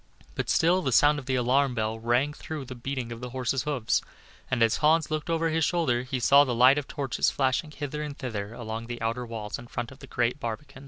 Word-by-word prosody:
But - - -3
still 180 +3 +3
the 135 - -1
sound 145 +5 +5
of 135 - -11
the 130 - +1
alarm 130 +1 +2
bell 110 0 -2
rang 120 +6 +1
through 150 -2 -6
the 130 - -7
beating 125 -1 -4
of 115 0 -7
the 125 - -5
horses' 130 +1 -1
hoofs, 135 -7 0 0.5
and 125 -2 +2
as 115 - +3
Hans 155 +1 +3
looked 155 +2 -2
over 165 0 +1
his 160 0 +1
shoulder, 150 -7 +1
he 130 +1 -3
saw 140 +4 +6
the 125 -4 -1
light 130 +4 +6
of 145 - -7
torches 135 -3 0
flashing 135 +3 0
hither 150 0 -5
and 150 -1 -5
thither 110 -6 -4
along 115 -1 -5
the 120 0 -5
outer 115 +2 -2
walls 110 -2 -5
in 120 - -11
front 120 0 -5
of 130 - -14
the - - -11
great 120 +3 0
barbican. 135 +4 -6
130 Hz, 235 wpm, -27 LUFS, 120-145 Hz, 0.5 s, saw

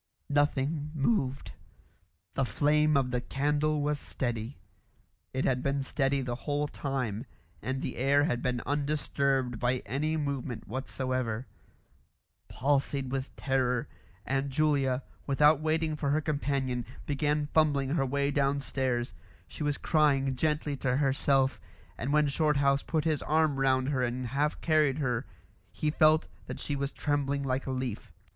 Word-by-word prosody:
Nothing 145 +1 +1
moved. 140 - 0 0.8
The 135 - +1
flame 150 +3 +3
of 130 -2 +1
the 125 0 0
candle 150 +3 0
was 150 0 0
steady. 120 -1 -3 0.7
It 130 - -1
had 125 -1 +1
been 140 0 0
steady 135 0 0
the 125 -2 -3
whole 145 +4 -1
time, 130 -5 -3 0.3
and 130 +1 -3
the - - -4
air 140 +3 +3
had 125 -5 0
been 125 -2 -1
undisturbed 140 -4 0
by 125 +1 0
any 155 +5 -1
movement 140 -5 -3
whatsoever. 130 -1 -2 1.0
Palsied 135 -1 0
with 135 0 -3
terror, 125 -3 0 0.4
Aunt 135 +1 0
Julia, 135 -2 +1 0.2
without 150 +2 +4
waiting 155 0 0
for 145 -2 -1
her 150 +2 +3
companion, 140 -4 -1 0.2
began 150 +1 0
fumbling 145 -4 +3
her 150 -3 +2
way 140 +2 0
downstairs; 135 -3 0 0.3
she - - -10
was 145 -1 0
crying 140 -4 +2
gently 150 +1 0
to 125 0 0
herself, 135 -1 +2 0.3
and 140 - -3
when 150 0 +4
Shorthouse 140 -2 +2
put 155 -2 -1
his 155 -4 +1
arm 155 -2 +2
round 130 0 +2
her 135 -3 0
and 125 +1 -1
half 140 +5 0
carried 155 -4 +3
her 125 -6 -1 0.4
he 150 - -1
felt 155 +1 +4 0.2
that - - -5
she 145 - -2
was 140 0 -2
trembling 140 -1 -1
like 135 0 -1
a - - -1
leaf. 130 -4 -4
140 Hz, 145 wpm, -30 LUFS, 130-150 Hz, 1.0 s, without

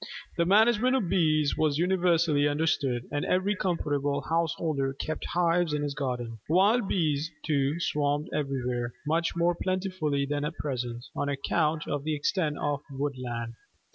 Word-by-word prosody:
The 170 - +1
management 225 +5 +4
of 205 -10 0
Bees 155 -5 +2
was 150 -2 +1
universally 170 -4 +3
understood, 145 -5 0
and 145 - -1
every 190 +3 +1
comfortable 145 -6 -1
householder 160 -4 0
kept 155 +3 -4
hives 170 -2 +1
in 145 - -1
his 145 -1 -2
garden. 125 -5 -3
Wild 200 +6 +4
bees, 155 -4 0 0.2
too, 145 +1 +1
swarmed 145 -1 0
everywhere 125 -4 -2
much 165 +3 0
more 170 +1 +2
plentifully 185 -6 -1
than 145 +1 -2
at 160 +3 -4
present, 125 -4 -4
on 145 - -1
account 150 +2 0
of 145 -1 -2
the 155 0 -1
extent 150 0 0
of 145 -1 -1
woodland. 125 -4 -4
150 Hz, 145 wpm, -28 LUFS, 140-170 Hz, 0.2 s, management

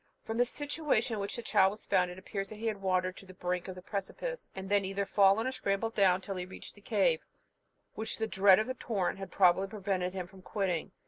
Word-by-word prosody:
From 225 +1 -3
the 245 - +5
situation 290 -4 -1
in 215 - -2
which 200 0 -3
the 235 - -5
child 190 -3 +4
was 210 +2 -9
found, 180 -1 +2
it 180 - -8
appears 195 +1 -4
that 215 - -8
he 220 +2 -7
had 215 -3 -1
wandered 185 -1 +1
to - - -10
the 185 - -12
brink 180 0 -2
of 185 - -6
the 185 - -10
precipice, - - -5
and 190 0 -5
then 200 0 +3
either 195 +1 -1
fallen 200 +3 +4
or 260 - 0
scrambled 225 -2 -1
down 190 -3 +4
till 195 -1 -5
he 180 - -3
reached 190 - -10
the 205 - -18
cave, 195 -8 +2 0.7
which 220 - -3
the 220 - 0
dread 190 -2 +6
of 215 - +1
the 255 - -3
torrent 200 -7 -2
had 195 -1 -6
probably 190 +1 +4
prevented 190 -3 -2
him 185 -2 -3
from 190 +1 -15
quitting. 185 -4 -2
195 Hz, 245 wpm, -31 LUFS, 185-220 Hz, 0.7 s, dread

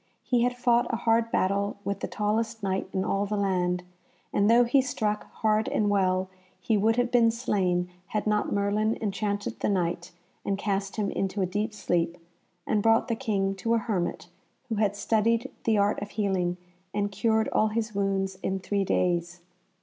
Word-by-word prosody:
He 245 -2 +1
had 245 +1 +1
fought 240 -1 +2
a - - 0
hard 230 0 +1
battle 200 +2 0
with 200 -1 -2
the - - -3
tallest 220 +1 -1
Knight 190 -1 -1
in 190 -1 -1
all 200 +1 0
the 210 +1 -2
land, 180 -2 0 0.5
and 205 +1 +3
though 235 +1 +6
he 255 +3 +4
struck 215 -5 -2
hard 215 0 +1
and 205 -1 +1
well, 185 -1 +2 0.3
he 225 - +1
would 220 +2 +3
have 245 0 +1
been 235 -2 +5
slain 190 -6 0 0.2
had 215 - -2
not 210 0 +1
Merlin 205 +2 +1
enchanted 205 0 -2
the - - 0
Knight 175 -2 -1 0.3
and 195 - -1
cast 195 -1 -2
him 210 -2 -1
into 195 0 -1
a - - +2
deep 205 +5 -2
sleep, 175 -4 -1 0.5
and 210 - +1
brought 225 +4 +3
the 230 - +1
King 200 -6 0
to 230 +5 +1
a - - +3
hermit 210 -6 -2 0.4
who 225 - -1
had 205 -1 +1
studied 230 +4 +1
the 220 -2 +3
art 200 0 +2
of 205 - -5
healing, 190 -4 -1 0.4
and 205 0 0
cured 220 +2 +1
all 215 - +2
his 215 0 -2
wounds 195 -1 -1
in 190 - -1
three 200 +1 -1
days. 175 -2 0
205 Hz, 185 wpm, -27 LUFS, 195-225 Hz, 0.5 s, though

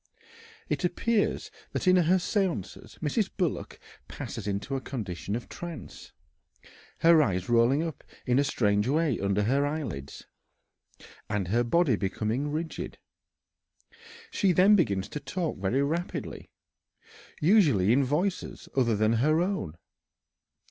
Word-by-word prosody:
It - - -2
appears 220 +5 0 0.2
that - - -2
in 185 - +6
her 180 0 +4
séances, 190 0 -2
Mrs. 190 +7 0
Bullock 180 -7 -2 0.3
passes 100 - -6
into 100 +7 -2
a 135 - -2
condition 105 -6 -4
of 120 0 -5
trance, 170 -2 -9 0.9
her 165 -1 +7
eyes 95 -8 0
rolling 120 +6 +3
up 165 -4 -6 0.2
in 125 +2 +3
a - - +4
strange 105 -5 +1
way 150 -2 +1
under 100 +1 +1
her 135 +6 +2
eyelids, 135 - -4 1.0
and 100 -4 -1
her 120 +4 +2
body 135 -1 +2
becoming 110 +8 -2
rigid. 160 +2 -4 1.3
She 195 - +2
then 195 +4 +6
begins 100 - +1
to 150 - -5
talk 170 - -3
very 115 +9 +1
rapidly, 165 +5 -4 0.9
usually 150 - +4
in 140 +2 +3
voices 165 +9 -2
other 120 -4 +2
than 110 +2 +2
her 155 +4 +3
own. 175 - -2
140 Hz, 125 wpm, -28 LUFS, 105-170 Hz, 1.3 s, her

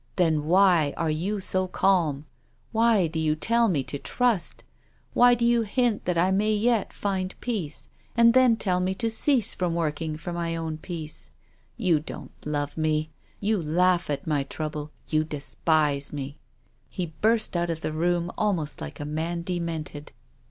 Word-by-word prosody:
Then 160 -5 +2
why 175 -4 +4
are 165 -2 0
you 190 +7 -1
so 185 0 0
calm? 170 -7 +1 0.5
Why 225 -4 +3
do 160 0 -3
you 155 -1 +1
tell 230 +8 +2
me 155 -9 +1
to 140 - -4
trust? 235 - 0 0.5
Why 245 0 +6
do 235 0 0
you 235 0 +4
hint 230 0 0
that 180 -1 0
I 180 +3 +3
may 210 +3 +2
yet 225 0 +1
find 190 -2 -3
peace, 195 -11 -4 0.3
and 235 0 +6
then 255 -2 +5
tell 185 -5 0
me 185 +1 0
to 230 +2 -1
cease 245 -1 +2
from 175 -2 -1
working 155 -1 -2
for 175 +2 -6
my 170 -1 -2
own 160 -1 -4
peace? 160 -3 -6 0.5
You 180 -9 +2
don't 150 - -8
love 145 0 -3
me, 155 0 0 0.3
you 210 -1 +1
laugh 175 +2 +2
at 140 -1 -2
my 150 -3 +1
trouble. 150 +1 -5 0.2
You 155 0 +2
despise 150 -1 0
mc." 140 -1 -5 0.5
He 175 -4 -4
burst 220 -2 +2
out 175 0 0
of 165 -1 -3
the 155 - -3
room 175 +2 0
almost 180 -8 0
like 75 - -7
a 145 - -4
man 165 +3 -3
demented. 165 -4 -4
170 Hz, 170 wpm, -26 LUFS, 155-205 Hz, 0.5 s, Why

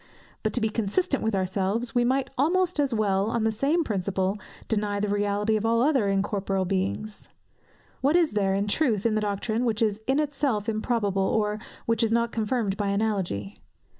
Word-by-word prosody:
But 215 - 0
to 245 - -1
be 220 - +2
consistent 230 - 0
with 220 -2 0
ourselves, 195 +5 -1
we 245 - +3
might 265 +2 0
almost 350 +4 +1
as 280 -2 +2
well, 200 -3 +1
on 230 -1 0
the 220 - +2
same 285 +10 +1
principle, 195 - -1 0.3
deny 205 -2 0
the 210 - 0
reality 205 +1 +1
of 215 - -1
all 230 +1 +3
other 270 -7 +2
incorporeal 195 -1 0
beings. 100 - -3 0.7
What 285 +5 +3
is 340 -3 +4
there, 195 -2 +1
in 200 +1 0
truth, 220 -3 +1
in 230 - +3
the 215 - +1
doctrine, 210 +3 -1
which 225 -2 +1
is 215 -1 0
in 270 +2 +2
itself 275 -8 -1
improbable, 215 -3 0
or 210 +2 0 0.3
which 230 0 +1
is 225 -1 +2
not 235 0 +1
confirmed 220 -3 -1
by 205 - -1
analogy? 200 - -2
215 Hz, 185 wpm, -26 LUFS, 200-240 Hz, 0.7 s, is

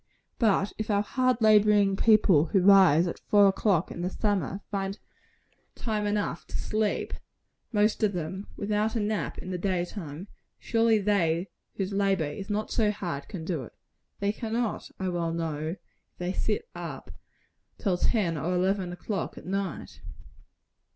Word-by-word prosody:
But 205 -3 +2
if 215 - -3
our 205 -1 +2
hard 255 +2 +1
laboring 210 -2 +5
people 200 -7 +5
who 190 +3 +2
rise 185 -4 +7
at 170 - -4
four 205 -1 +4
o'clock 190 -3 +1
in 170 - -6
the 180 - -1
summer, 195 -2 -1
find 195 0 -2 0.8
time 215 -2 -2
enough 205 0 -2
to - - -4
sleep 215 -1 -1 0.6
most 210 -1 +2
of 210 -2 +2
them 180 +3 -4
without 210 +2 0
a - - +1
nap 210 0 -2
in 185 - -6
the 180 - -3
day 180 -1 0
time, 175 -2 -8 0.3
surely 225 -1 +2
they 190 -4 +1 0.3
whose 195 0 -3
labor 195 -3 +2
is 170 +8 -6
not 210 +1 -2
so 220 -3 +2
hard, 175 -9 -4
can 175 -6 -7
do 165 -5 -2
it. 115 - -12 0.5
They 200 0 +1
cannot, 225 +1 -3
I 190 - -2
well 170 -2 -1
know, 160 -1 -3 0.4
if - - -48
they 180 +1 -2
sit 215 - -1
up - - -7 0.7
till 195 -5 0
ten 175 -6 +1
or 180 +6 -1
eleven 185 0 0
o'clock 185 +1 -4
at - - -10
night. 195 -3 -4
195 Hz, 160 wpm, -28 LUFS, 175-210 Hz, 0.8 s, rise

